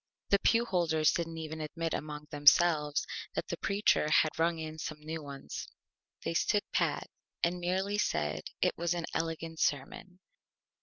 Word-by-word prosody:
The 200 - +5
Pew 230 +3 +3
Holders 165 -6 +2
didn't 165 -1 -3
even 160 0 -5
admit 165 +2 -3
among 150 0 -4
themselves 150 0 +4 0.3
that - - -3
the - - -2
Preacher 200 -6 +2
had 155 0 +4
rung 165 0 +2
in 160 0 -6
some 155 0 -5
New 160 +1 -5
Ones. 140 -2 -7 0.6
They - - -1
stood 205 +4 +2
Pat, - - +1 0.4
and 175 +1 +1
merely 190 +4 0
said 75 - 0 0.2
it - - +2
was 170 0 +1
an 170 -1 -2
Elegant 165 0 -3
Sermon. 165 +6 -2
165 Hz, 155 wpm, -31 LUFS, 150-175 Hz, 0.6 s, The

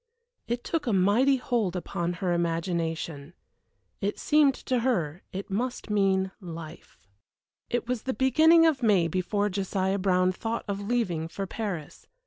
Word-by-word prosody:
It 240 +1 -2
took 325 -5 -2
a 230 - +2
mighty 210 +9 +4
hold 235 -8 -1
upon 175 -1 -2
her 175 0 -1
imagination. 165 -2 -2 0.7
It 200 +1 -1
seemed 295 -3 +4
to 255 -1 -1
her 185 - -1
it 195 +1 -6
must 240 +2 -3
mean 190 -2 +2
Life. 165 -3 -9 0.7
It 240 0 -1
was 250 -2 -1
the 260 - -3
beginning 320 +5 +5
of 305 -5 +2
May 200 -7 +4
before 190 +4 0
Josiah 195 0 -1
Brown 185 -1 +2
thought 225 +5 -4
of 200 -1 -2
leaving 200 -8 -1
for 195 +4 -5
Paris. 190 -7 -5
195 Hz, 145 wpm, -27 LUFS, 175-240 Hz, 0.7 s, beginning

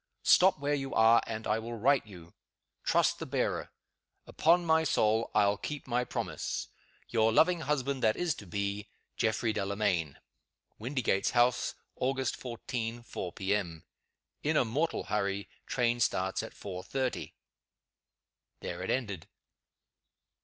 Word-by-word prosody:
Stop 185 -1 +6
where 145 0 -1
you 135 -2 -2
are, 115 +1 +6
and 110 -1 -4
I 110 +1 +1
will 115 +1 -6
write 135 +1 +3
you. 85 -4 -13 0.5
Trust - - +2
the - - -5
bearer. - - -1 0.6
Upon 170 +2 +3
my 160 0 +4
soul, 110 -6 +2
I'll 100 0 +4
keep 150 +6 -5
my 125 -1 0
promise. - - -3 0.4
Your 115 -1 +3
loving 170 +9 +4
husband 140 -3 -1
that 110 0 +3
is 175 -3 0
to 100 - -12
be, 100 +3 -3 0.3
"GEOFFREY 110 0 +1
DELAMAYN." 100 -7 -1 0.6
WINDYGATES 120 -4 0
HOUSE, 120 +1 +3 0.3
Augt. 135 0 0
14, 120 -1 -5
4 90 -6 -5
P. 95 +1 -1
M. 85 -5 -4 0.6
"In 155 +1 +1
a - - +4
mortal 145 +9 -1
hurry. 100 -1 -1 0.2
Train 120 -1 +1
starts 95 -4 +1
at - - -9
4.30." 100 +7 -4 1.3
There - - -5
it - - -4
ended! 105 -10 -2
115 Hz, 135 wpm, -31 LUFS, 100-135 Hz, 1.3 s, Stop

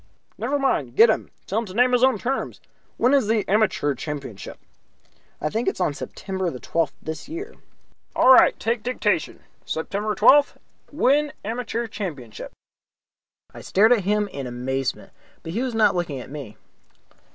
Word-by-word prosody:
"Never 250 +7 -1
mind. 145 - 0
Get 225 +6 +7
him; - - -3 0.2
tell 205 - -1
him 230 - -5
to 185 - -10
name 250 +2 +4
his 250 0 +3
own 260 -3 +4
terms. 260 +6 -3 0.4
When 250 +4 +3
is 275 -7 +3
the 215 -2 +1
Amateur 190 -8 +2
Championship?" 140 -6 -7 0.8
"I 155 - -1
think 230 +2 -2
it - - +1
is - - -12
on 180 -5 +1
September 190 +4 -4
the 125 - -7
twelfth 165 +4 -1
this 160 - -6
year." 380 +8 -6 0.6
"All 260 - +7
right, - - +6
take 230 0 -1
dictation. 210 -8 -1 0.2
September 205 +6 -3
twelfth 290 +1 +5 0.3
win 295 0 +2
Amateur 235 +1 -3
Championship." 150 - -7 1.0
I - - -10
stared 220 +5 +4
at 230 - +1
him 210 +2 +1
in 135 -2 -6
amazement, 130 +9 -3 0.3
but 165 - -6
he 225 - -1
was 255 -3 -2
not 215 -3 +4
looking 165 -6 -2
at 125 - -10
me. 140 -8 -8
210 Hz, 165 wpm, -23 LUFS, 155-245 Hz, 1.0 s, Get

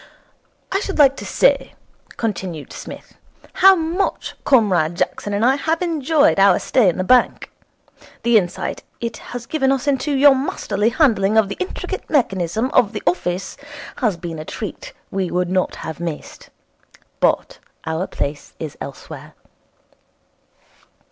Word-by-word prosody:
'I 385 - +1
should 395 -1 -4
like 275 -3 +6
to - - -7
say,' - - +2 0.4
continued 185 -8 -4
Psmith, - - -10 0.4
'how 385 +1 +7
much 340 +3 -2
Comrade 185 - +3
Jackson 205 - -2
and 205 +3 +1
I 265 +2 +4
have 320 +3 0
enjoyed 310 - +2
our 195 -2 +6
stay 235 -8 +3
in 175 - -2
the 185 - 0
bank. 250 +6 +2 0.7
The 235 0 +3
insight 185 -3 0 0.2
it 235 -1 -4
has 245 -1 -8
given 270 -2 +1
us 270 0 0
into 285 +1 0
your 280 +1 +7
masterly 220 -5 -1
handling 220 -7 +2
of 215 -3 +4
the - - -5
intricate 370 - -5
mechanism 220 - 0
of 240 -3 +3
the 210 - -5
office 180 +1 -1 0.4
has 215 -8 0
been 165 -2 -6
a - - -5
treat - - -7 0.2
we 190 -2 -1
would 180 0 -1
not 185 -1 0
have 160 0 -6
missed. 170 -3 -7 0.7
But - - +1 0.3
our 160 +3 -2
place 145 +1 -5
is 155 -3 -6
elsewhere.' 140 - -9
220 Hz, 145 wpm, -20 LUFS, 180-275 Hz, 0.7 s, how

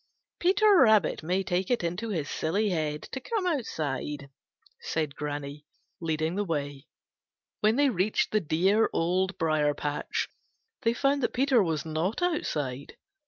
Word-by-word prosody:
Peter 390 +2 +5
Rabbit 220 -8 +4
may 180 +4 0
take 180 0 -1
it 245 -7 +1
into 180 +7 -2
his 160 -8 -2
silly 200 +10 0
head 155 -3 -2
to 265 - -4
come 410 - -2
outside," 150 - -3 0.5
said 155 -3 -2
Granny, 145 0 -5 0.3
leading 160 0 -1
the 205 +2 0
way. 145 -5 -4 0.7
When 215 +1 +3
they 285 +1 +4
reached 195 +1 0
the 215 - +3
dear 190 +7 +2
Old 185 +3 0
Briar 155 -2 +1
patch 145 0 -2 0.5
they 230 - +2
found 280 +2 +1
that 235 - 0
Peter 260 -2 +3
was 160 -5 -1
not 160 - -1
outside. 145 - -2
175 Hz, 145 wpm, -28 LUFS, 150-225 Hz, 0.7 s, Peter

